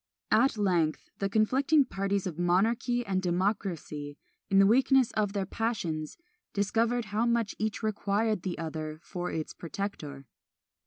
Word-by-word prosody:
At 230 +2 +4
length 175 -6 0
the 195 - 0
conflicting 265 +8 +3
parties 195 -3 -1
of 175 -3 -5
monarchy 225 +7 +1
and 190 -2 0
democracy, 175 -6 -2 0.3
in 195 - +3
the 195 - +7
weakness 260 +3 +4
of 205 -2 0
their 200 -2 -1
passions, 180 -8 -3 0.4
discovered 225 +4 +1
how 225 +3 +2
much 235 -3 +1
each 215 +1 -2
required 215 -1 0
the 180 -1 -3
other 155 -1 -5
for 180 -1 -4
its 160 -1 -4
protector. 165 -7 -6
200 Hz, 140 wpm, -29 LUFS, 175-225 Hz, 0.4 s, the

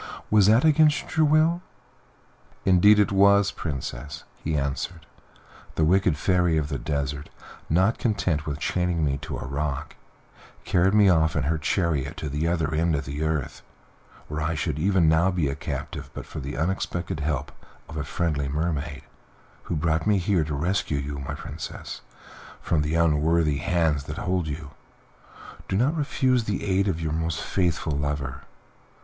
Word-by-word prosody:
Was 105 -2 +6
that 115 +7 +5
against 155 -1 +3
your 155 -1 +4
will?" 160 +3 +3 1.0
"Indeed 95 +3 +6
it 105 -2 +3
was, 100 +1 +5
Princess," 75 0 -5 0.2
he 80 0 0
answered; 75 +4 -3 0.7
"the 80 - +2
wicked 90 -2 +3
Fairy 90 -1 +2
of 75 -2 -1
the 70 -4 -3
Desert, 70 +1 -3 0.4
not 95 +8 +2
content 90 -9 0
with 75 -1 -2
chaining 90 0 0
me 70 -1 -1
to - - -5
a - - -6
rock, 70 0 -3 0.7
carried 95 +1 +3
me 105 -2 +6
off 80 -4 +3
in 70 - +1
her 80 +2 0
chariot 75 -3 -1
to 75 - -4
the 75 +4 -1
other 80 -3 0
end 80 +1 +2
of 70 -1 -3
the 70 +3 -5
earth, 80 -4 -2 0.7
where 75 +1 -4
I 80 +1 -1
should 75 -1 -2
even 95 -1 +3
now 80 +4 +4
be 90 -6 0
a 70 - -2
captive - - -5
but - - -6
for - - -7
the 70 +2 -5
unexpected 85 0 -2
help 75 -1 -2 0.4
of - - -9
a 75 - -2
friendly 75 -1 -1
mermaid, 75 0 -2 0.6
who - - -2
brought 80 +3 0
me 105 -1 +4
here 90 -2 +1
to 75 -1 -3
rescue 80 0 0
you, 70 0 -4
my 70 - -5
Princess, - - -7 0.6
from 80 - 0
the 75 +2 -1
unworthy 80 -1 +2
hands 80 -3 +1
that 75 +3 -6
hold 95 -5 -1
you. 75 -1 -6 1.0
Do 95 - 0
not 135 +9 +2
refuse 130 -5 +1
the 105 -2 -2
aid 100 0 +1
of 90 -4 -1
your 80 -2 -2
most 80 -1 -1
faithful 85 -4 0
lover." 70 -2 -3
80 Hz, 165 wpm, -25 LUFS, 75-95 Hz, 1.0 s, Was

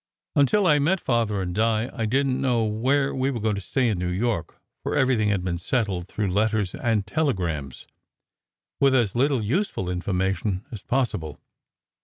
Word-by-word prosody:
Until 145 +9 +4
I 150 -4 +5
met 175 +7 +2
Father 115 - 0
and 90 -1 -4
Di 110 +2 +1
I 110 -2 -2
didn 135 +5 +2
t - - -2
know 125 -4 +1
where 130 +6 +1
we 130 +1 0
were 110 -5 -1
to 100 - -3
stay 125 +5 0
in 105 -6 0
New 90 0 -1
York, 95 -2 -2 0.2
for - - -2
everything 125 -5 +2
had 100 -3 0
been 85 -2 -2
settled 95 -3 -1
through 105 0 -2
letters 105 -1 +1
and 110 -4 0
telegrams, 90 - -2 0.9
with 135 -1 +4
as 115 -6 +2
little 130 -1 +1
useful 120 - -1
information 95 +2 -1
as 110 -5 -7
possible. 115 - -2
110 Hz, 170 wpm, -25 LUFS, 95-130 Hz, 0.9 s, I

